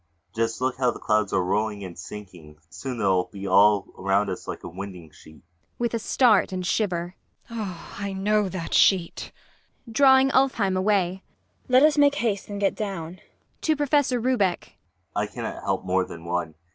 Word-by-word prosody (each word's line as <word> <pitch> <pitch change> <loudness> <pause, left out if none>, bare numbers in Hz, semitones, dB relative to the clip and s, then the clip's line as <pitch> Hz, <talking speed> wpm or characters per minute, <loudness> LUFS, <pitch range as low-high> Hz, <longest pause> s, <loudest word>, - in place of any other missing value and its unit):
Just 115 +1 -1
look 130 0 0
how 130 -2 +2
the - - -4
clouds 105 -2 +1
are 95 - +1
rolling 105 +2 -1
and 90 -2 -8
sinking 85 -5 -11
soon 125 +7 -6
they'll 95 -4 +2
be 100 -1 -9
all 100 0 +5
around 100 +1 +1
us 90 - -7
like - - -6
a - - -6
winding 90 -3 -9
sheet! 80 0 -17 0.2
IRENE. 85 - -44
[With 240 -1 -1
a 230 - 0
start 220 -3 +3
and 185 -1 -3
shiver.] 175 -2 -1 0.4
I 200 -2 -6
know 205 +1 +1
that 170 -2 -5
sheet! 180 -4 +2 0.6
MAIA. 230 - -10
[Drawing 265 0 +5
ULFHEIM 235 -9 +2
away.] 190 -1 +1 0.4
Let 255 +2 +5
us 300 -1 +4
make 285 0 +5
haste 215 -8 -2
and 205 -1 -5
get 200 -1 +2
down. 195 -6 -4
ULFHEIM. 180 - -20
[To 315 - +2
PROFESSOR 285 -3 +1
RUBEK.] 220 -8 0 0.4
I - - 0
cannot - - -6
help - - -1
more 95 0 +2
than 85 -2 -10
one. 85 -2 -3
175 Hz, 180 wpm, -25 LUFS, -, 0.6 s, all